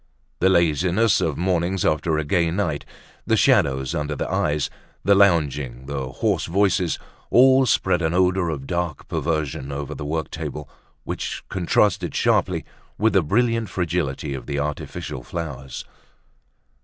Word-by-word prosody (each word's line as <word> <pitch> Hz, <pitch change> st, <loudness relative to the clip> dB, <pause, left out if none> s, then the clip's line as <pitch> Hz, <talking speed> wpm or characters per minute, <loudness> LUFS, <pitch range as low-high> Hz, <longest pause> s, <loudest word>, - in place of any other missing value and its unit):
The 95 Hz, -, +4 dB
laziness 90 Hz, +5 st, +3 dB
of 75 Hz, -4 st, -1 dB
mornings 90 Hz, +1 st, 0 dB
after 75 Hz, +1 st, +1 dB
a 80 Hz, -, 0 dB
gay 85 Hz, +3 st, +1 dB
night, 80 Hz, -5 st, -2 dB, 0.4 s
the -, -, +3 dB
shadows 65 Hz, -1 st, +3 dB
under 75 Hz, 0 st, -2 dB
the -, -, -3 dB
eyes, 75 Hz, -1 st, +1 dB, 0.4 s
the 100 Hz, -, +5 dB
lounging, 75 Hz, -10 st, +2 dB
the 70 Hz, -2 st, -4 dB
hoarse -, -, -1 dB
voices, 95 Hz, -1 st, +1 dB, 0.3 s
all 130 Hz, +1 st, +6 dB
spread 85 Hz, -, +2 dB
an 80 Hz, -1 st, +1 dB
odor 90 Hz, 0 st, +2 dB
of 70 Hz, -4 st, -4 dB
dark 85 Hz, -1 st, -3 dB
perversion 80 Hz, -4 st, -2 dB
over 70 Hz, +1 st, -4 dB
the 75 Hz, -, -7 dB
work 80 Hz, +1 st, -3 dB
table -, -, -5 dB, 0.4 s
which -, -, -4 dB
contrasted 95 Hz, +2 st, +1 dB
sharply -, -, +1 dB, 0.3 s
with 110 Hz, +2 st, +2 dB
the 95 Hz, -, +5 dB
brilliant 115 Hz, +6 st, +1 dB
fragility 80 Hz, -6 st, -2 dB
of 65 Hz, -3 st, -7 dB
the 70 Hz, -1 st, -2 dB
artificial 70 Hz, -3 st, -4 dB
flowers. 70 Hz, -3 st, -6 dB
80 Hz, 145 wpm, -23 LUFS, 70-95 Hz, 0.4 s, all